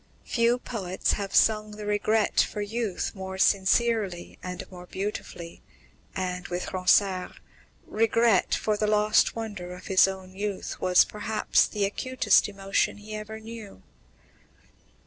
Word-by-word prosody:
Few 235 0 +2
poets 195 -7 -2
have 200 -2 -3
sung 215 -1 +3
the 210 0 -8
regret 210 +1 +1
for - - -3
youth 210 -1 -2
more 190 -1 -7
sincerely 200 -1 +1
and 180 0 -6
more 180 -1 -11
beautifully, 190 -4 -6 0.5
and, 180 -1 -3
with 180 0 -4
Ronsard, 185 0 +2 0.5
regret 225 -1 +2
for 215 - 0
the 210 - 0
lost 210 0 +3
wonder 205 -6 -6
of 180 - -13
his 190 0 +5
own 190 -1 -7
youth 200 0 -4
was 180 -1 +5
perhaps 210 0 +1
the 205 -1 -1
acutest 255 +3 +2
emotion 195 0 -1
he 210 +1 -10
ever 215 +1 -6
knew. 220 - -10
205 Hz, 130 wpm, -26 LUFS, 185-215 Hz, 0.5 s, his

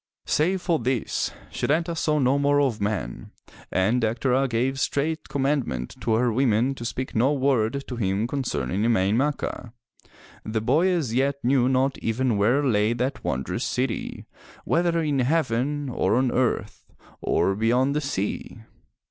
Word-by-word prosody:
Save 180 +4 +1
for 170 -3 +1
this, 125 -1 -1 0.2
Setanta 165 +3 0
saw 155 -1 +1
no 135 0 +2
more 145 0 +3
of 130 -7 0
men, 100 - -3 0.4
and 110 +7 +2
Dectera 125 +4 +1
gave 130 +3 0
straight 155 +4 -1
commandment 135 - -1
to 110 -1 +1
her 120 0 +2
women 125 +1 +2
to 120 -3 -8
speak 130 +2 -4
no 125 +5 +3
word 135 -2 +1
to 125 - -5
him 100 0 0
concerning 125 -7 -2
Emain 110 -3 +2
Macha. 135 -3 -2 0.7
The 110 0 -2
boy 145 +11 +3
as 165 -11 0
yet 135 +3 +2
knew 125 0 +3
not 130 +1 +1
even 120 +1 0
where 120 +8 +2
lay 110 -3 +2
that 125 +3 -3
wondrous 65 +1 -2
city, 125 -2 -2 0.4
whether 170 0 +1
in 145 -3 0
heaven 140 0 0
or 120 -3 +1
on 130 0 +2
earth 120 -5 -1 0.3
or 95 - +1
beyond 125 +6 +2
the 150 - +1
sea. 110 -4 -4
130 Hz, 150 wpm, -25 LUFS, 115-140 Hz, 0.7 s, more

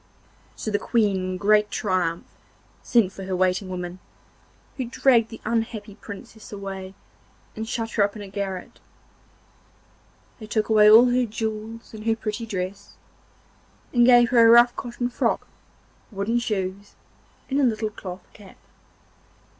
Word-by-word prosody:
So 215 - -4
the 205 - +1
Queen 215 -4 +1
in 185 0 -3
great 210 +2 +3
triumph 180 -5 -1 0.6
sent 225 -6 +2
for 195 - -8
her 190 0 -2
waiting 185 +1 0
women, 180 0 -6 0.8
who 260 - -2
dragged 235 -1 +3
the 225 - -10
unhappy 225 -2 -2
Princess 210 +1 -11
away 195 -2 -7 0.6
and 220 0 -5
shut 225 -2 -3
her 205 - +2
up 200 +1 -1
in 210 - -7
a - - -9
garret; 195 -1 -5 1.6
they 215 - -9
took 215 0 -1
away 210 -1 +6
all 235 +3 +8
her 250 0 +2
jewels 220 +1 -5
and 215 +1 -8
her 225 - +3
pretty 225 +1 -5
dress, 185 -1 -5 1.0
and 240 -1 +4
gave 240 -1 +6
her 235 -2 +6
a 230 - +7
rough 240 +1 +7
cotton 245 0 -4
frock, 245 - -1 0.6
wooden 215 +3 -1
shoes, 200 -3 -4 0.5
and 275 +1 0
a - - +3
little 220 -3 0
cloth 185 -2 -8
cap. 200 -3 -15
215 Hz, 145 wpm, -24 LUFS, 195-230 Hz, 1.6 s, all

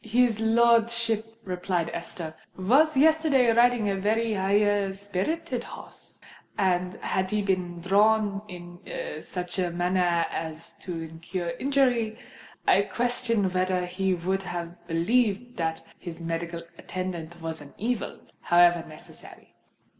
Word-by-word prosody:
"His 230 0 +2
lordship," 230 -1 +2
replied 180 -2 -2
Esther, 170 -1 -6 0.2
"was 270 +11 +4
yesterday 300 -5 +4
riding 240 -2 +4
a 200 - +1
very 220 +3 +1
high 205 0 +2
spirited 205 - -3
horse; - - -11 0.4
and 180 -2 +1
had 190 0 -1
he 210 0 0
been 180 -3 -1
thrown 205 +1 +3
in 175 -2 -10 0.4
such 180 0 -5
a 180 -1 +1
manner 175 -1 +1
as 160 0 -5
to 175 -3 -5
have 165 - -6
incurred 170 +1 -4
injury, 250 -5 +2 0.5
I - - +6
question 230 -2 0
whether 185 0 +1
he 185 +1 0
would 190 +3 -1
have 175 -1 -6
believed 220 +7 +1
that 160 -1 -2
his 170 -1 -8
medical 170 0 -4 0.2
attendant 175 -2 -5
was 165 -1 -5
an 145 -1 -13
evil, 230 0 -2 0.2
however 175 -1 +4
necessary." 155 - -14
190 Hz, 125 wpm, -27 LUFS, 175-225 Hz, 0.5 s, I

